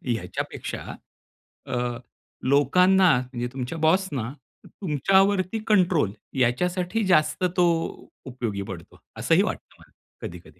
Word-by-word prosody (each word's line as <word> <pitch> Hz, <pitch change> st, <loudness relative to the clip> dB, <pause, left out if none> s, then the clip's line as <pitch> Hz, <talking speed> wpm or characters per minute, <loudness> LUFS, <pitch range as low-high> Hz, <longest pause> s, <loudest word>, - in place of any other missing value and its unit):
याच्यापेक्षा 110 Hz, -, -5 dB, 0.9 s
अ, -, -, -3 dB, 0.7 s
लोकांना 180 Hz, +8 st, +4 dB
म्हणजे 125 Hz, -1 st, -4 dB
तुमच्या 130 Hz, +4 st, -4 dB
बॉसना 155 Hz, -, +1 dB, 0.3 s
तुमच्यावरती 190 Hz, -, +1 dB
कंट्रोल 180 Hz, -, +3 dB, 0.3 s
याच्यासाठी 180 Hz, -, 0 dB
जास्त 155 Hz, -1 st, +2 dB
तो 180 Hz, -, +5 dB, 0.6 s
उपयोगी 120 Hz, -6 st, -4 dB
पडतो, 95 Hz, -4 st, -10 dB, 0.2 s
असंही -, -, +3 dB
वाटतं -, -, -5 dB
मला -, -, -20 dB, 0.4 s
कधी-कधी. 90 Hz, +1 st, -13 dB
155 Hz, 95 wpm, -25 LUFS, 125-185 Hz, 0.9 s, तो